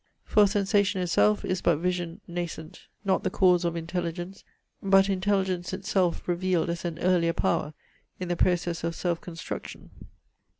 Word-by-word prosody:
For 210 -1 +4
sensation 200 0 +1
itself 185 +4 +2
is 185 -1 -1
but 170 -3 +3
vision 175 0 -2
nascent, 170 -2 -6 0.2
not 190 -1 +2
the - - +1
cause 180 -2 +3
of 170 -1 -1
intelligence, 175 +2 -4 0.4
but 195 0 +4
intelligence 190 -2 0
itself 190 -2 0
revealed 175 -1 0
as 170 +1 -5
an 170 -2 -3
earlier 170 -2 +2
power 155 -3 0 0.4
in 185 - -4
the 175 - 0
process 175 -1 0
of 165 0 -2
self 170 -2 -2
construction. 165 -2 -8
180 Hz, 145 wpm, -27 LUFS, 170-190 Hz, 0.4 s, For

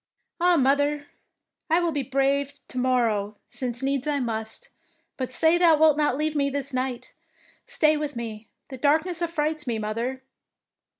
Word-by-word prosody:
" - - -51
" - - -19
Ah, 355 0 +4
mother, 285 +2 +2 0.6
I 330 +2 +4
will 345 -1 0
be 290 -2 -1
brave 275 +2 0 0.2
to 255 - -4
mor 255 -1 +2
row, 210 -1 -2
since 245 -1 -4
needs 275 +1 -1
I 290 -1 +1
must. 220 -3 -4 0.5
But 255 -3 -3
say 320 +6 +3
thou 335 -3 +6
wilt 310 -1 +5
not 295 -3 +1
leave 310 +1 -1
me 280 -1 +1
this 280 0 -4
night? 255 -1 -3 0.5
Stay 305 -1 +2
with 295 -2 -4
me; 225 -2 -6 0.2
the 260 - -8
darkness 320 +5 +1
affrights 310 -3 -2
me, 235 -2 -1
mother." 230 +5 -3
280 Hz, 175 wpm, -25 LUFS, 250-305 Hz, 0.6 s, thou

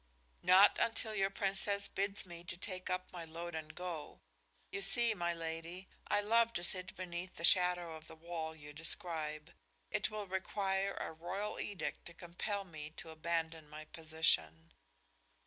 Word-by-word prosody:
"Not 185 +3 +8
until 225 -1 +2
your 195 -2 +2
Princess 200 +1 +1
bids 200 0 0
me 175 -1 -9
take 185 +2 -3
up 185 0 -2
my 175 -2 -5
load 170 +2 -6
and 155 -1 -5
go. 175 -4 -5 0.5
You 200 - -2
see, 225 +4 +5
my 175 -4 0
lady, 165 +2 -5 0.2
I 205 - +3
love 230 +2 +4
to 175 - -2
sit 185 +1 -1
beneath 180 0 -5
the - - -7
shadow 180 -2 +4
of 155 0 -11
the - - -10
wall 160 -1 -4
you 150 -1 -10
describe. 155 -1 0 0.4
It - - +2
will 215 -1 -4
require 195 +1 0
a - - -3
royal 190 +6 -3
edict 190 -7 -3
to 170 - -11
compel 195 +4 -3
me 155 -5 -7
to 160 - -6
abandon 160 -1 -2
my 155 +1 -8
position." 155 - +1
175 Hz, 160 wpm, -36 LUFS, 160-195 Hz, 0.5 s, Not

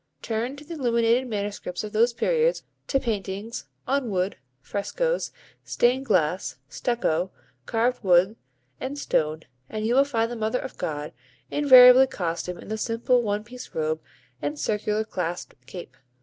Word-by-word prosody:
Turn 230 +4 -2
to 290 +1 -12
the 335 - -7
illuminated 240 -3 +2
manuscripts 205 -4 -4
of 210 0 -7
those 230 +3 +4
periods, 475 - +1 0.2
to 270 - +2
paintings, 215 -1 -4 0.2
on 270 -2 0
wood, 185 0 0 0.2
frescoes, 485 - -2 0.3
stained 260 +3 +1
glass, 180 - +1
stucco, 185 - -1 0.4
carved 235 +2 0
wood, 185 +3 +4 0.4
and 270 +2 -4
stone, 155 - 0 0.3
and 215 0 -3
you 230 - +2
will 270 +2 +6
find 230 -4 -1
the - - -4
Mother 220 +2 0
of 265 - -6
God 150 -1 -4 0.4
invariably 260 -2 +8
costumed 175 -3 -4
in - - -12
the 220 0 -3
simple 235 +2 +1
one 210 -2 -1
piece 250 +3 -11
robe 155 0 -1 0.4
and 145 +1 -2
circular 210 +6 0
clasped 180 -5 -4
cape. 175 +6 -9
225 Hz, 150 wpm, -25 LUFS, 185-250 Hz, 0.4 s, invariably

